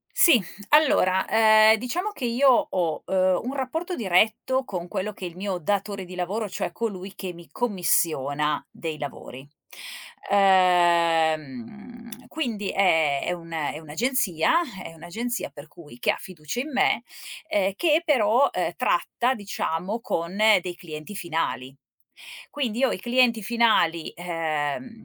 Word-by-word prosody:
Sì, 320 -8 +6 0.3
allora, 225 -11 +3
ehm, 220 0 +6
diciamo 345 - -3
che 255 - -4
io 255 +4 +4
ho, 175 - 0
uhm, 185 -1 +2
un 255 +3 -4
rapporto 320 +7 -3
diretto 220 +6 +1
con 180 -7 -5
quello 205 +3 -4
che 190 - -9
è - - -3
il 170 - -18
mio 190 0 -3
datore 200 +3 -2
di 180 0 -11
lavoro, 195 +4 -3
cioè - - -3
colui 195 -1 -5
che 185 -2 -6
mi 170 -1 -14
commissiona 150 - 0
dei 160 -2 -6
lavori. 140 -2 -8 0.8
Uhm, 180 - +1
quindi 235 -10 -3
è 160 -7 +2
è - - -1
un 170 -1 -8
è 150 -1 -3
un'agenzia 190 - +1 0.2
è - - -8
un'agenzia 220 +9 -5
per 145 +2 -12
cui 150 -6 -15
che - - +1
ha - - 0
fiducia 170 +4 -6
in 295 +4 -5
me, 260 - +2 0.5
ehm, 200 -8 +1
che 320 +5 +2
però, 255 -3 +3
uhm, - - 0
tratta 250 +2 0
diciamo 200 -1 -3
con 170 -5 -3
dei 200 -4 +3
clienti 155 +2 -9
finali. 160 -7 -3 0.8
Quindi 245 -6 -3
io 270 - +3
i - - -5
clienti 240 0 +2
finali, 205 -8 +2
ehm, 160 - -2
mhmm, 230 -2 -14
190 Hz, 145 wpm, -24 LUFS, 165-235 Hz, 0.8 s, Sì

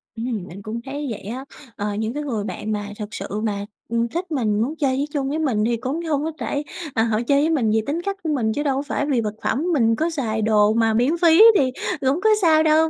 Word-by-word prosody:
Ừm, 225 -4 -3
mình 190 +4 -10
cũng 225 +3 -5
thấy 285 +1 -4
vậy 215 - -5
á. 250 +7 -6 0.3
Ờ, 205 0 -2
những 220 +2 -2
cái 295 +1 -3
người 225 -8 -2
bạn 215 +1 -4
mà 205 -1 -3
thực 210 +1 -6
sự - - -5 0.2
mà, 200 -2 -2 0.2
ừm, 235 0 +1
thích 345 +6 -4
mình, 215 -7 +1
muốn 275 +7 -1
chơi 275 -5 +1
với 280 - 0
chung 275 -2 -1
với 310 +2 -1
mình 245 -9 +1
thì 235 0 +1
cũng 270 +8 -3
hông 300 -2 0
có 320 - -2
trải 285 - -2 0.3
ờ, 225 - +3
họ 225 -1 +1
chơi 280 0 +4
với 310 - +2
mình 255 -10 +2
vì 220 0 +2
tính 325 +4 -1
cách 395 +1 -3
của 320 - -2
mình 220 -4 0
chứ 290 - -2
đâu 275 -3 +1
có 275 - 0
phải 290 0 -2
vì 270 -5 +1
vật 210 -1 -3
phẩm, 280 - 0
mình 230 -5 +3
có 325 +5 0
xài 230 -9 -2
đồ 215 0 +4
mà 225 -1 +2
miễn 255 +9 +2
phí 335 +1 +6 0.2
thì 260 -3 +2 0.3
cũng 275 +6 +1
có 440 - +4
sao 315 -3 +5
đâu, 315 +1 +4
260 Hz, 270 wpm, -22 LUFS, 220-300 Hz, 0.3 s, phí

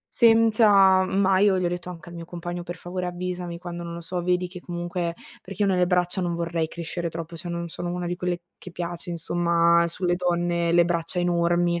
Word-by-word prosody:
Senza 215 -5 +6
ma 190 0 +2
io 195 -1 +4
gli 180 - 0
ho - - +2
detto 175 0 -5
anche 170 -1 -10
al 175 - -10
mio 170 0 -7
compagno: 175 0 -6
“Per 175 +1 -7
favore, 180 +1 -5
avvisami 180 -1 -4
quando, 175 -1 -6
non 170 0 -6
lo 170 - -6
so, 175 +1 -3
vedi 180 0 +1
che 180 0 -9
comunque” 175 -1 -3 0.3
perché 195 +2 -4
io - - +2
nelle 180 -1 +3
braccia 180 +1 +1
non 175 -1 -1
vorrei 170 -1 -1
crescere 170 +1 -5
troppo, 165 +1 -7
cioè 175 +2 -6
non 170 0 -3
sono 175 +1 -4
una 180 0 -3
di 175 - -2
quelle 180 -1 -2 0.2
che 185 - -11
piace, 175 0 -5
insomma, 170 0 +2
sulle 175 +1 0
donne, 175 -1 0
le 170 0 +6
braccia 170 +1 -1
enormi. 175 0 +2
175 Hz, 215 wpm, -25 LUFS, 170-180 Hz, 0.3 s, Senza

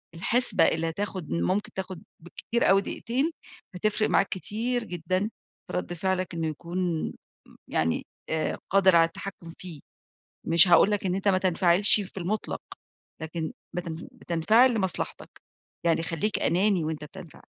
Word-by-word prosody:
الحسبة 235 +9 +3
اللي 165 0 0
هتاخد 185 -1 -5
م 85 +1 0
ممكن 210 +2 -1
تاخد 185 -2 -6 0.2
بالكتير 230 +7 -2
أوي 195 +1 +5
دقيقتين، 260 +10 -2 0.4
هتفرق 215 +3 0
معاك 195 - +3
كتير 230 +6 -2
جدًا، 180 -2 -2 0.5
في 180 - -3
رد 180 -1 -4
فعلك 185 +1 -2
إنه 165 -1 -2
يكون 170 +1 -3 0.4
م - - -19
يعني 80 +1 -1 0.2
آآ 160 0 -1
قادر 190 -2 +5
على 165 0 +6
التحكُم 165 0 -8
فيه، 175 -5 -9 0.7
مش 165 +2 +6
هاقول 175 +3 +6
لك 205 -2 -1
إن 180 - 0
أنت 195 +1 -1
ما 190 -1 +4
تنفعلش 185 +2 +5
في 195 -1 -9
المُطلق، 205 +5 -3 0.6
لكن 160 0 -4 0.2
بتنف 170 -2 -5
بتنفعل 220 +10 +3
لمصلحتك، 190 -6 -3 0.6
يعني 165 -1 +2
خلّيك 170 +5 -1
أناني 185 -1 +2
وأنت 155 -1 -4
بتنفعل. 170 +1 -12
180 Hz, 145 wpm, -26 LUFS, 165-200 Hz, 0.7 s, على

